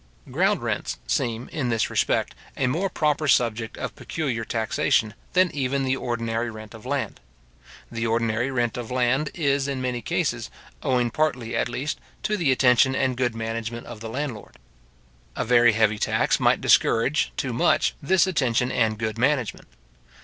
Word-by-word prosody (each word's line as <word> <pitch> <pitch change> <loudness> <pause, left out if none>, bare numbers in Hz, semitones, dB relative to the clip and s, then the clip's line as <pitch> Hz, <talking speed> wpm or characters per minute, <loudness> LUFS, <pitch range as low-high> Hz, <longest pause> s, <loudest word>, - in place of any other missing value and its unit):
Ground - - +1
rents - - -2
seem, 115 +1 -1
in 140 -6 -2
this 115 -3 0
respect, - - +1 0.2
a - - +1
more 165 +10 0
proper 155 -3 0
subject 115 -3 +1
of - - -5
peculiar 130 -8 -3
taxation, 110 -1 0 0.2
than 185 -1 +4
even 135 -1 -1
the 130 0 +1
ordinary 115 -2 -2
rent 110 0 -10
of 110 +2 -11
land. 140 -1 -2 0.7
The 115 0 -2
ordinary 115 +2 0
rent 120 -4 -1
of 120 -2 -5
land 130 +3 +1
is, 140 -4 +1
in 135 -2 -2
many 125 -1 -2
cases, - - -1 0.3
owing 125 -2 +1
partly, 125 -6 -1
at - - 0
least, 140 +5 -3 0.2
to 210 - 0
the 165 -9 +2
attention 130 0 +4
and 130 -1 +1
good 120 -2 0
management 115 +1 -4
of 120 -2 -9
the 115 +1 -6
landlord. 125 -3 -5 0.8
A - - -2
very 120 -1 +5
heavy 110 -1 +2
tax - - +1
might - - +3
discourage, 135 +6 +3
too 130 -3 -2
much, 115 - +2
this 185 +6 +3
attention 130 -9 +1
and 110 -2 +1
good 110 0 -3
management. 130 -3 0
125 Hz, 165 wpm, -24 LUFS, 115-135 Hz, 0.8 s, very